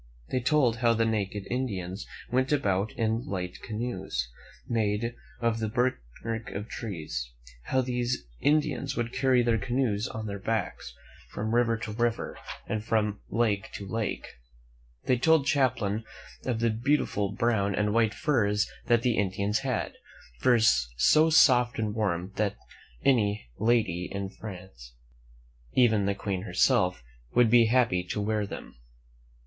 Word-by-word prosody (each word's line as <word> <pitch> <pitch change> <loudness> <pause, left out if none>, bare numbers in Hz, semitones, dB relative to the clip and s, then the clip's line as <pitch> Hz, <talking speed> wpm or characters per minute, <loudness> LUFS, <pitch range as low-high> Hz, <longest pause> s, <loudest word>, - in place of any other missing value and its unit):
They 130 - +1
told 125 -3 +2
how 120 -1 +3
the 115 0 +2
naked 105 -2 -2
Indians 100 -7 -3 0.2
went 130 +3 +1
about 105 -8 +1
in 115 +1 0
light 90 -2 -4
canoes, 95 - -3 0.4
made 110 0 0 0.3
of 115 -1 0
the 110 -1 -1
bark 125 - +1 0.6
of 105 +2 -4
trees; 80 - -5 0.4
how 130 - +2
these 125 - -2
Indians 145 -2 +1
would 120 0 -2
carry 130 -2 +3
their 115 -1 +2
canoes 120 -1 0
on 110 -1 -6
their 100 -1 -4
backs 100 - -3 0.3
from 110 +2 -3
river 120 -1 +3
to 110 -1 -5
river 115 +1 -1 0.3
and 110 -1 -3
from 105 -2 0
lake 105 -3 0
to 100 - -6
lake. 110 +3 -3 0.8
They 125 -2 +2
told 160 +1 +4
Champlain 120 -7 +1 0.4
of 120 -3 -1
the 115 -1 +3
beautiful 110 -4 0
brown 100 -3 +1
and 105 0 +1
white 110 -1 +2
furs 105 -9 +1 0.2
that 120 -1 +3
the 120 -4 +2
Indians 100 +2 0
had 130 -4 -2 0.2
— - - -23
furs 110 - +4
so 155 - +5
soft 125 -6 +5
and 110 -2 -1
warm 95 -4 -1
that 105 -1 0 0.5
any 105 - +2
lady 110 -6 +1
in 100 -1 -3
France, 90 - -10 0.8
even 110 -5 +4
the 100 - +1
Queen 100 -2 -3
herself, 90 - +2 0.3
would 120 -2 +5
be 120 -2 +6
happy 115 -7 +2
to 100 - -3
wear 105 0 0
them. - - -9
110 Hz, 145 wpm, -28 LUFS, 100-120 Hz, 0.8 s, be